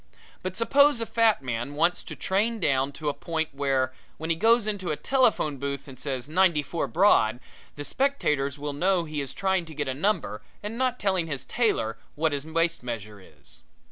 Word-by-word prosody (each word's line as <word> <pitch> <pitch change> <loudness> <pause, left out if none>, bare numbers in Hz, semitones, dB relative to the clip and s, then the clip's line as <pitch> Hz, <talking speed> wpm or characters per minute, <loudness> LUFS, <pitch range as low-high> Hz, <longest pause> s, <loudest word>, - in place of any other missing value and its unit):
But 185 0 -5
suppose 280 +3 +4
a 230 - -1
fat 225 -9 +2
man 125 +3 -3
wants 170 +4 +2
to - - -7
train 215 +4 0
down 135 -5 +1
to 150 +2 -6
a - - -1
point 160 0 -3
where, 135 -2 0 0.2
when 160 +1 -2
he - - +3
goes 225 +5 +4
into 205 -4 -2
a 155 - 0
telephone 225 - +2
booth 140 0 -4
and 130 -2 -11
says 135 -2 -3
"Ninety 170 -2 +3
four 165 +3 -2
Broad," 120 - +4 0.4
the 145 - -5
spectators 150 - 0
will 145 0 -4
know 180 +4 +2
he 155 -2 -4
is 135 - -4
trying 190 -2 0
to 160 -1 -11
get 150 -1 -2
a 130 - -1
number 160 - -1 0.2
and 210 +2 -4
not 255 0 0
telling 190 -4 +1
his 140 -4 -4
tailor 115 - 0 0.2
what 160 +1 +1
his 145 +1 -3
waist 165 +1 0
measure 105 -4 -6
is. - - -18
160 Hz, 200 wpm, -26 LUFS, 140-195 Hz, 0.4 s, suppose